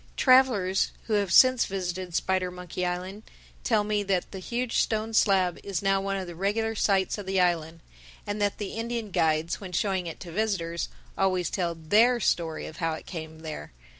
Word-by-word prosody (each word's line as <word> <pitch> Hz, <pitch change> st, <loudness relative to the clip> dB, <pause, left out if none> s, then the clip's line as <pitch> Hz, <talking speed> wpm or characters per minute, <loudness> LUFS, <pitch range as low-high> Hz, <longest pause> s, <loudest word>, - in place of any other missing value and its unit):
Travelers 250 Hz, -8 st, +4 dB
who 220 Hz, -, -3 dB
have 200 Hz, -3 st, +1 dB
since 255 Hz, +3 st, +6 dB
visited 185 Hz, -2 st, -4 dB
Spidermonkey 180 Hz, -1 st, -2 dB
Island 185 Hz, +3 st, -4 dB, 0.4 s
tell 220 Hz, -4 st, +2 dB
me 210 Hz, 0 st, 0 dB
that 195 Hz, -3 st, -1 dB
that 190 Hz, -, -6 dB
huge 240 Hz, +5 st, -2 dB
stone 220 Hz, 0 st, 0 dB
slab 190 Hz, -5 st, +3 dB
is 195 Hz, -2 st, -3 dB
now 195 Hz, 0 st, +2 dB
one 195 Hz, 0 st, -2 dB
of 190 Hz, -, -4 dB
the 175 Hz, -, -8 dB
regular 215 Hz, +5 st, 0 dB
sights 195 Hz, -2 st, +1 dB
of 200 Hz, -, -8 dB
the 190 Hz, 0 st, +1 dB
island. 165 Hz, -2 st, 0 dB, 0.4 s
And 205 Hz, 0 st, -3 dB
that 205 Hz, -1 st, +1 dB
the 205 Hz, -2 st, -4 dB
Indian 230 Hz, -2 st, -4 dB
guides, 160 Hz, +1 st, +1 dB
when 185 Hz, -2 st, -8 dB
showing 190 Hz, -1 st, 0 dB
it 165 Hz, -, -7 dB
to 175 Hz, -, -8 dB
visitors, 170 Hz, -4 st, -1 dB, 0.3 s
always 185 Hz, -3 st, +1 dB
tell 175 Hz, -3 st, -1 dB
their 215 Hz, +10 st, +3 dB
story 165 Hz, -6 st, 0 dB
of 160 Hz, -, -9 dB
how 165 Hz, -2 st, -1 dB
it 155 Hz, -, -8 dB
came 160 Hz, -2 st, -8 dB
there. 155 Hz, -, -7 dB
190 Hz, 185 wpm, -27 LUFS, 175-210 Hz, 0.4 s, since